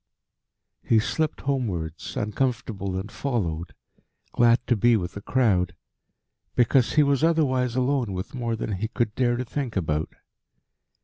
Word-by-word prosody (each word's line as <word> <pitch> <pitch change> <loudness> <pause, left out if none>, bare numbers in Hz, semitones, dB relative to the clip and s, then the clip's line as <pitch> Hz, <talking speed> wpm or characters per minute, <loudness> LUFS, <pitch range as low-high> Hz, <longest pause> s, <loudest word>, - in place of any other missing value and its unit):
He 115 - +3
slipped 155 +8 0
homewards, 90 - -3
uncomfortable 105 -4 -2
and 100 +3 -5
followed, 85 - -2 0.6
glad 120 0 +4
to 120 - +2
be 115 +2 +4
with 90 -3 -4
a 100 - -6
crowd 95 -7 +1 0.8
because 120 +1 +3
he 150 - +5
was 140 0 +2
otherwise 130 -7 +2
alone 130 -3 +1
with 95 +1 -5
more 120 -3 -2
than 105 -3 -3
he 110 +4 -2
could 115 -1 -1
dare 120 0 +1
to 125 - -3
think 130 -1 -4
about. 80 -4 -1
115 Hz, 140 wpm, -25 LUFS, 95-130 Hz, 0.8 s, he